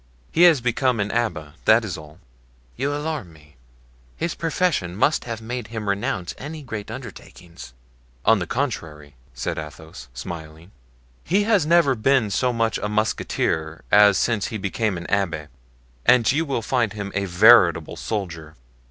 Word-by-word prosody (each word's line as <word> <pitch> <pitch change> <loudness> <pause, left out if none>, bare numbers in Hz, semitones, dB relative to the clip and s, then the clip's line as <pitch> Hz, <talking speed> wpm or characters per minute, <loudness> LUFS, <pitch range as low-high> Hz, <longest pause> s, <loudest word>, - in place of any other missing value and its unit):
"He 165 - +1
has 150 -7 +1
become 125 0 +1
an 105 0 -1
abbé, 105 -12 -2
that 110 +1 +5
is 95 - -4
all." 75 -1 -12 0.6
"You 140 +3 -1
alarm 145 - -4
me; 75 -2 -20 0.6
his 170 0 -2
profession 160 - -1
must 145 +10 +1
have 115 -2 -6
made 120 0 -5
him 110 -2 -6
renounce 100 -2 -2
any 150 +2 -7
great 110 -5 -6
undertakings." 85 -8 -10 0.5
"On 115 -2 +5
the 90 - -4
contrary," 80 - -4 0.2
said 60 - -3
Athos, 75 -4 -10
smiling, 80 +5 -8 0.5
"he 195 +5 +2
has 205 -8 +2
never 170 -4 +4
been 125 -2 +2
so 125 +4 +1
much 115 -1 0
a 105 - -3
musketeer 80 -6 -1
as 105 -2 +6
since 110 -1 0
he 110 - -4
became 100 0 -1
an 85 - -7
abbé, 85 -7 -1 0.5
and 125 -1 +5
you 160 +4 0
will 135 -6 -2
find 120 -2 0
him 100 -2 -5
a 100 - -1
veritable 90 -4 +5
soldier." 85 -8 -5
105 Hz, 155 wpm, -23 LUFS, 85-125 Hz, 0.6 s, as